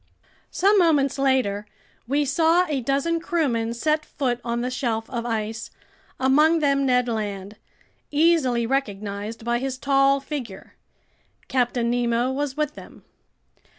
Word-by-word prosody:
Some 400 +2 +3
moments 290 -6 +2
later, 250 -7 +1 0.4
we 285 +3 +1
saw 325 +5 +3
a 285 -4 -1
dozen 280 +7 0
crewmen 270 -10 -1
set 305 +5 0
foot 245 -5 -2
on 235 0 -2
the 250 +1 -2
shelf 230 -4 -2
of 235 -1 -3
ice, 220 -1 -3 0.5
among 300 +5 +4
them 280 -3 +1
Ned 250 -1 +2
Land, 205 -3 -4 0.5
easily 295 -6 +2
recognized 215 -3 -3
by 240 0 +1
his 260 0 -3
tall 275 0 +3
figure. 265 -8 -7 0.7
Captain 240 -2 0
Nemo 240 +1 +1
was 280 +1 -3
with 300 -1 -1
them. - - -13
260 Hz, 130 wpm, -23 LUFS, 235-290 Hz, 0.7 s, among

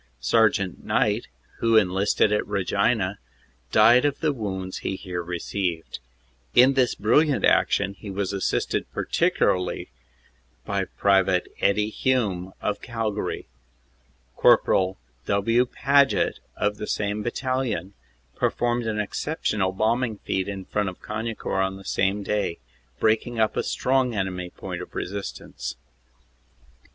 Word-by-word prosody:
Sergt. 100 - +2
Knight, - - +1 0.3
who 115 -1 +4
enlisted 100 +1 +3
at 105 - 0
Regina, 100 +1 0 0.5
died 115 +4 +6
ot 145 -1 0
the 155 -3 +1
wounds 95 -6 -4
he 95 - -3
here 90 -2 -5
received. 85 0 -3 0.6
In 130 +2 +7
this 130 -3 +2
brilliant 140 +8 +3
action 100 - +3
he 100 +1 -10
was 100 0 -2
assisted 100 - -1
partic - - +1
ularly 90 -1 0 0.8
by - - -1
Pte. 95 -2 +2 0.2
Eddie 105 +2 +2
Hume, 105 -9 0
of 105 0 -1
Calgary. 110 -5 -3 0.9
Corp. 95 0 +4 0.3
W. 115 +5 +2
Paget, 140 +2 +2 0.2
of 105 0 0
the 105 - -5
same 105 0 -1
battalion, 120 -5 -2 0.4
performed 120 -1 0
an 110 -1 -1
exceptional 105 -3 -1
bombing 110 +3 0
feat 95 -1 -2
in 100 -2 -5
front 105 -2 -1
of 90 - -11
Cagnicourt 105 -3 -2
on 95 0 -2
the 95 - -13
same 100 +2 0
day, 100 -4 -1 0.4
breaking 110 +2 +1
up 110 -1 +2
a - - +1
strong 130 -2 +1
enemy 90 -2 -2
point - - -7
of - - -10
resistance. 100 +2 -5
105 Hz, 125 wpm, -25 LUFS, 95-115 Hz, 0.9 s, In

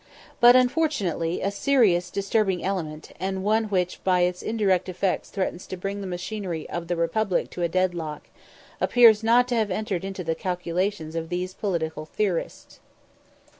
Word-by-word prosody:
But 240 +1 +8
unfortunately, 245 - +1
a 195 - 0
serious 200 -6 +2
disturbing 200 -2 0
element, 160 -6 -4
and 190 0 -2
one 220 +2 +2
which 180 -4 -1
by 180 -1 +3
its 180 0 0
indirect 195 -5 +1
effects 185 +1 -1
threatens 185 -2 -3
to 185 - -6
bring 200 +2 -4
the 195 - -5
machinery 180 -2 -4
of 170 -1 -4
the 175 - -1
Republic 180 +3 0
to 180 - -6
a 170 - +1
"dead 185 +1 +1
lock," 155 -3 -6 0.5
appears 230 -3 +6
not 240 +2 +4
to 245 - 0
have 220 -2 +1
entered 195 -2 -2
into 195 -1 -5
the 165 -1 0
calculations 180 0 -2
of 165 0 -3
these 180 +1 -3
political 165 -6 -3
theorists. 185 -1 -3
185 Hz, 165 wpm, -25 LUFS, 175-210 Hz, 0.5 s, But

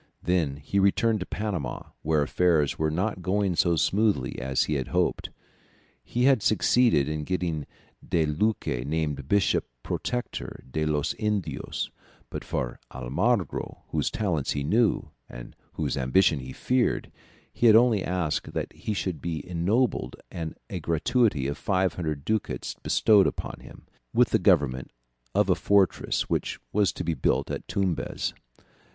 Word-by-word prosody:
Then 80 -5 +1
he 75 +7 -1
returned 105 +3 +3
to 90 - -5
Panama, 95 - -4
where 75 -1 +2
affairs 80 -2 +2
were 80 0 +2
not 95 +5 -1
going 95 0 +1
so 85 0 +3
smoothly 95 - +1
as 65 +1 +1
he 75 - -2
had 65 -3 -1
hoped. - - 0 0.7
He 120 - -1
had 130 -3 +5
succeeded 110 - +3
in 75 0 -2
getting 85 -3 -2 0.4
De 80 -2 +1
Luque 75 - 0
named 75 -2 -2
Bishop 100 +3 +2 0.2
protector 125 0 -4
de 80 +2 0
los 75 0 0
Indios; 105 -4 -2 0.4
but - - -5
for - - -3
Almagro, 75 - -1
whose - - 0
talents 85 -10 -1
he 70 - -2
knew, 110 +9 +2 0.2
and - - -10 0.2
whose - - -2
ambition 70 +4 +3
he 65 0 -7
feared, 125 - 0 0.4
he 120 - +3
had 110 - +8
only 115 -4 +5
asked 90 -4 -2
that - - -3
he 105 - -4
should 90 -7 -3
be 80 -4 -4
ennobled 95 +9 0 0.2
and 80 -2 -5
a - - -4
gratuity 85 - +1
of 70 +1 -3
500 90 -6 -1
ducats 105 - -2
bestowed 105 -3 +4
upon - - -4
him, - - -14 0.3
with - - +4
the - - +3
government 65 -3 +2 0.5
of - - +3
a - - +5
fortress 100 -2 +2
which - - -1
was 105 -2 +3
to - - -5
be 85 0 0
built - - 0
at - - -5
Tumbez. 95 -4 -1
85 Hz, 150 wpm, -27 LUFS, 75-105 Hz, 0.7 s, had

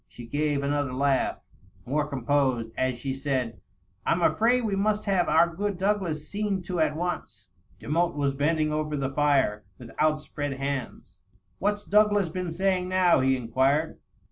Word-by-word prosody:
She 120 - -11
gave 145 +2 -1
another 145 -2 -1
laugh, 140 0 +1 0.5
more 150 +3 0
composed, 130 -4 0
as 130 -1 0
she 135 +2 -3
said, 130 -4 -2 0.2
" 95 +2 -40
I'm 170 +1 +2
afraid 240 +7 +3
we 210 -3 0
must 210 +2 0
have 190 -4 +1
our 165 +2 +3
good 200 0 -2
Douglas 185 -6 -1
seen 200 -1 -2
to 175 -1 -3
at 155 -1 +2
once." 155 - -5 0.3
Demotte 170 +2 0
was 140 -2 0
bending 155 +2 +1
over 150 -1 -2
the 135 -1 -2
fire, 135 -8 +2
with 120 -2 -11
outspread 150 -2 0
hands. 135 - -5 0.4
"What's 205 +1 -1
Douglas 205 -3 +3
been 180 0 -4
saying 185 +1 0
now?" 185 -3 +4
he 130 0 +2
inquired. 135 +6 0
150 Hz, 160 wpm, -26 LUFS, 135-180 Hz, 0.5 s, now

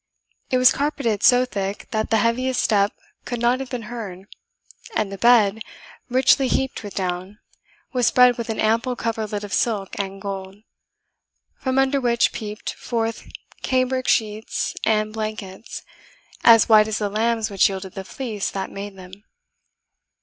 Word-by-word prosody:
It 255 - +2
was 255 0 +6
carpeted 275 -8 -1
so 250 +2 +5
thick 200 -4 -4
that 215 0 -1
the 225 - +3
heaviest 245 +4 +1
step 205 -1 +2 0.3
could 240 -1 -4
not 240 +2 +2
have 270 -1 -6
been 245 -2 -4
heard, 210 -5 -7 0.7
and 200 -2 0
the 195 - -6
bed, 220 -3 +5 0.5
richly 260 +2 +4
heaped 265 +1 -1
with 205 -2 -9
down, 185 +1 -3 0.6
was 250 -2 +2
spread 250 -1 +5
with 235 -1 -5
an 220 - -3
ample 230 +3 +1
coverlet 220 -3 -3
of 205 - -6
silk 205 -5 0
and 195 0 -4
gold; 195 -1 -6 1.0
from 260 0 -1
under 270 +1 +2
which 235 -1 +2
peeped 210 -1 -5
forth 230 -1 -3 0.3
cambric 255 0 0
sheets 215 0 0
and 215 -1 +1
blankets 215 -2 -6 0.6
as 225 -2 +7
white 215 -2 +6
as 220 - -2
the 210 - -1
lambs 220 +1 0
which 195 0 +4
yielded 190 -1 -6
the 195 - -6
fleece 215 -1 -4
that 195 -1 -5
made 200 0 -7
them. 185 0 -12
220 Hz, 155 wpm, -22 LUFS, 200-245 Hz, 1.0 s, as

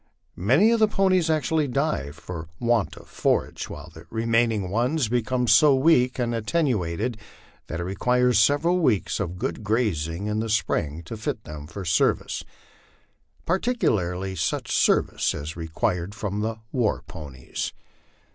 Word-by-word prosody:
Many 135 - +5
of 230 - +3
the 215 - +5
ponies 185 -4 +2
actually 155 0 +1
die 135 - -1
from 80 +1 -8
want 120 -3 +1
of - - -13
forage, - - -1
while - - -9
the - - -13
remaining 115 -3 +1
ones 125 +4 +1
be 120 +1 +2
come 125 +2 -1
so 135 +6 +6
weak 130 -3 +3
and 120 -2 -1
attenuated 115 - -1 0.5
that 80 - -4
it - - -2
requires 125 +5 +2
several 145 +10 +3
weeks 120 - +1
of 90 -3 -3
good 105 - -3
grazing 100 -6 -1
in 105 0 -1
the 115 0 -2
spring 80 -7 0
to 85 - -7
fit 110 - -4
them 75 -1 -8
for 95 +3 -7
service 80 -2 +1 1.0
particularly 95 - 0
such 80 -2 -1
service - - +2
as 75 +1 -5
is 85 - -7
required 85 +3 -2
from 105 -3 -3
the 110 +1 -1 0.2
war 120 -5 0
ponies. 70 -5 -6
110 Hz, 150 wpm, -25 LUFS, 90-130 Hz, 1.0 s, so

